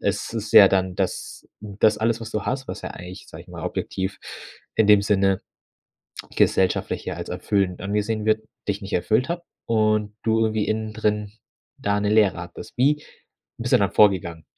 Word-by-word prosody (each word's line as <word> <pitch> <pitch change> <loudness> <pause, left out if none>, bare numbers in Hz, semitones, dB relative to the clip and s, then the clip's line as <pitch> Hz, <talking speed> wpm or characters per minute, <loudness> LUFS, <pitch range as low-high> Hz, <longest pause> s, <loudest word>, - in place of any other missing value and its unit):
Es 100 +2 -2
ist 110 -2 -4
ja 100 - +10
dann, 95 -1 0
dass 95 -2 -3
hm, 100 -2 -9
das 105 -1 +4
alles, 115 +1 0
was 110 0 -7
du 110 - -2
hast, 130 0 -2
was - - -5
ja - - -5
eigentlich, 90 +1 -10
sage - - -10
ich - - -23
mal, - - -8
objektiv 95 +1 -3 0.6
in 110 - +3
dem 105 -1 +6
Sinne 95 -2 +2 0.9
gesellschaftlich, 95 -1 +1
ja, - - -3
als - - -6
erfüllend 95 -3 -1
angesehen 105 +2 -2
wird, 110 0 +2 0.3
dich 100 +1 -2
nicht 95 - -8
erfüllt 110 - +1
hat 170 0 -3 0.2
und 110 -2 +1
du 115 0 +2
irgendwie 110 -1 +1
innen 110 0 -2
drin 105 -1 -1 0.5
da 100 0 0
'ne 105 0 0
Leere 105 -4 +4
hattest. 85 0 -9
Wie 150 +4 +2 0.6
bist - - -3
du - - +7
dann - - +1
vorgegangen? 85 -6 +3
105 Hz, 185 wpm, -23 LUFS, 95-110 Hz, 0.9 s, ja